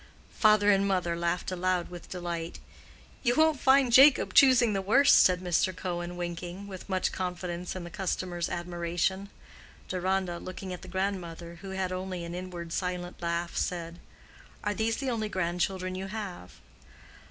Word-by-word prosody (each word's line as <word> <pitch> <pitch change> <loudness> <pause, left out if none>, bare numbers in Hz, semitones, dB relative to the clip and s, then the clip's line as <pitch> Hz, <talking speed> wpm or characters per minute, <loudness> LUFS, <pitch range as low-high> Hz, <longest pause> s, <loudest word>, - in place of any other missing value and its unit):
Father 215 -1 +5
and 200 0 +3
mother 180 -3 0
laughed 170 +2 -1
aloud 185 -1 -1
with 175 -2 -10
delight. 170 -2 -4 0.6
"You 245 -2 +2
won't 315 -2 +4
find 265 -2 +4
Jacob 275 +3 +7
choosing 250 -5 +6
the 195 - 0
worst," 270 +9 +6
said 180 -1 +3
Mr. 180 +1 +1
Cohen, 175 -1 -4
winking, 175 +2 -5
with 195 -1 -9
much 185 -1 0
confidence 180 -1 -4
in 185 - -5
the 170 - -8
customer's 180 -2 -2
admiration. 175 +3 -2 0.6
Deronda, 185 -1 -1
looking 185 0 -7
at 180 - -8
the 190 - -11
grandmother, 175 -3 -4
who 195 - -8
had 190 -1 -2
only 185 -1 -4
an 170 - -6
inward 175 -2 -6
silent 180 -1 -3
laugh, 170 0 -2
said, 170 -1 -3 0.6
"Are 210 - 0
these 225 +1 0
the 270 -2 -2
only 220 -2 -2
grandchildren 185 0 -1
you 190 +1 -4
have?" 195 - -6
185 Hz, 155 wpm, -29 LUFS, 175-195 Hz, 0.6 s, Jacob